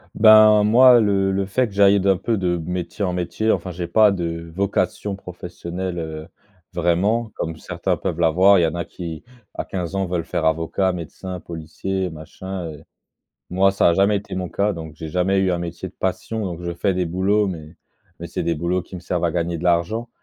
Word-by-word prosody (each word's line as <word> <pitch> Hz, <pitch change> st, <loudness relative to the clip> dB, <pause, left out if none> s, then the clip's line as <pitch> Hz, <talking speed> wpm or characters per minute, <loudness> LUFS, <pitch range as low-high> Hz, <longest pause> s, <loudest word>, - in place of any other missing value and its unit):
Ben, 110 Hz, -1 st, +7 dB
moi, 120 Hz, +3 st, +7 dB
le 100 Hz, -2 st, +2 dB
le 95 Hz, 0 st, 0 dB
fait 125 Hz, +5 st, 0 dB
que 100 Hz, -, -13 dB
j'aille 100 Hz, 0 st, +5 dB
d'un 95 Hz, -1 st, +2 dB
peu, 110 Hz, +3 st, -1 dB
de 90 Hz, -2 st, 0 dB
métier 90 Hz, +3 st, -4 dB
en 90 Hz, -, -1 dB
métier, 90 Hz, +5 st, -1 dB
enfin, 90 Hz, -, -2 dB
j'ai 85 Hz, 0 st, -5 dB
pas 110 Hz, -2 st, +5 dB
de 85 Hz, -2 st, -4 dB
vocation 100 Hz, +1 st, -1 dB
professionnelle, 90 Hz, -1 st, -6 dB
heu, 80 Hz, -1 st, -6 dB, 0.5 s
vraiment, 100 Hz, +7 st, +1 dB
comme 80 Hz, -1 st, -4 dB
certains 85 Hz, 0 st, -2 dB
peuvent 85 Hz, -1 st, -3 dB
l'avoir. 90 Hz, +4 st, +5 dB
Il -, -, +3 dB
y -, -, +4 dB
en 80 Hz, +1 st, -2 dB
a 85 Hz, -, -3 dB
qui 85 Hz, -1 st, -7 dB, 0.3 s
à -, -, -4 dB
15 90 Hz, 0 st, -4 dB
ans 95 Hz, -1 st, 0 dB
veulent 85 Hz, -2 st, -2 dB
faire 80 Hz, 0 st, -2 dB
avocat, 85 Hz, +4 st, +1 dB
médecin, 90 Hz, +2 st, -7 dB
policier, 85 Hz, +4 st, -4 dB
machin, 90 Hz, +4 st, -7 dB
heu. 75 Hz, -, -12 dB, 0.7 s
Moi, 95 Hz, +2 st, +3 dB
ça 95 Hz, -, +3 dB
a 85 Hz, -, +3 dB
jamais 100 Hz, +2 st, +3 dB
été 100 Hz, -1 st, -6 dB
mon 90 Hz, -1 st, -3 dB
cas, 100 Hz, +1 st, 0 dB
donc 80 Hz, -3 st, -8 dB
j'ai 80 Hz, 0 st, -7 dB
jamais 90 Hz, +3 st, +1 dB
eu 95 Hz, -1 st, +2 dB
un 85 Hz, -, -1 dB
métier 85 Hz, +2 st, -5 dB
de -, -, -20 dB
passion, 105 Hz, +3 st, -2 dB
donc 90 Hz, -2 st, -5 dB
je 85 Hz, 0 st, -3 dB
fais 95 Hz, +2 st, 0 dB
des 90 Hz, -1 st, 0 dB
boulots, 100 Hz, +4 st, +1 dB
mais 80 Hz, -2 st, -8 dB, 0.4 s
mais -, -, -6 dB
c'est -, -, -4 dB
des 85 Hz, -, 0 dB
boulots 85 Hz, +3 st, -1 dB
qui 95 Hz, -, -13 dB
me -, -, -8 dB
servent 90 Hz, -1 st, -2 dB
à -, -, 0 dB
gagner 85 Hz, 0 st, -2 dB
de -, -, -8 dB
l'argent 90 Hz, +7 st, +1 dB
90 Hz, 215 wpm, -21 LUFS, 85-100 Hz, 0.7 s, Ben